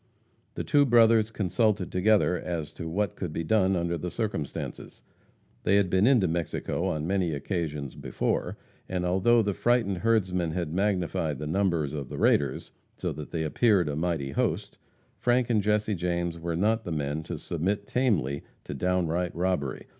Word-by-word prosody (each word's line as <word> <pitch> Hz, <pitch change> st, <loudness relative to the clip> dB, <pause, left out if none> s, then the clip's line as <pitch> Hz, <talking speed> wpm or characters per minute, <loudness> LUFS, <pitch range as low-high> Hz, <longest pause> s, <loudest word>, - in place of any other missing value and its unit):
The -, -, -3 dB
two 145 Hz, -1 st, +4 dB
brothers 115 Hz, -3 st, +5 dB
consulted 105 Hz, -1 st, 0 dB
together 95 Hz, 0 st, +3 dB
as 85 Hz, -4 st, -4 dB
to 80 Hz, -2 st, -6 dB
what 100 Hz, +2 st, -1 dB
could 90 Hz, -4 st, -4 dB
be 85 Hz, -, -3 dB
done 95 Hz, +1 st, +2 dB
under 85 Hz, -1 st, -1 dB
the 90 Hz, -, -3 dB
circumstances. 105 Hz, -, -5 dB, 0.6 s
They 100 Hz, -, +2 dB
had 100 Hz, -3 st, +2 dB
been 95 Hz, +4 st, +4 dB
into 125 Hz, -8 st, +4 dB
Mexico 85 Hz, 0 st, -2 dB
on 75 Hz, 0 st, -2 dB
many 90 Hz, -2 st, 0 dB
occasions 75 Hz, -4 st, -3 dB
before, -, -, -2 dB, 0.3 s
and, 90 Hz, -1 st, -1 dB
although 105 Hz, +6 st, +3 dB
the 100 Hz, -1 st, 0 dB
frightened 115 Hz, -5 st, +1 dB
herdsman 90 Hz, -7 st, +1 dB
had 85 Hz, -3 st, -3 dB
magnified 90 Hz, -6 st, 0 dB
the 75 Hz, -, -5 dB
numbers 85 Hz, -3 st, 0 dB
of 70 Hz, -4 st, -5 dB
the -, -, -6 dB
raiders, -, -, +1 dB, 0.3 s
so -, -, -2 dB
that 75 Hz, 0 st, -8 dB
they 80 Hz, -2 st, -2 dB
appeared 95 Hz, +2 st, +3 dB
a 75 Hz, -, -2 dB
mighty 80 Hz, -4 st, -1 dB
host, -, -, -2 dB, 0.4 s
Frank 125 Hz, 0 st, +2 dB
and 110 Hz, -2 st, +3 dB
Jesse 105 Hz, +1 st, +1 dB
James 85 Hz, -2 st, -2 dB
were 85 Hz, 0 st, -3 dB
not 110 Hz, +6 st, +1 dB
the 85 Hz, -, -5 dB
men 75 Hz, 0 st, -2 dB
to -, -, -6 dB
submit 100 Hz, +5 st, -2 dB
tamely 90 Hz, -, 0 dB, 0.2 s
to -, -, -6 dB
downright 90 Hz, +2 st, 0 dB
robbery. 85 Hz, -6 st, -1 dB
90 Hz, 170 wpm, -27 LUFS, 80-105 Hz, 0.6 s, brothers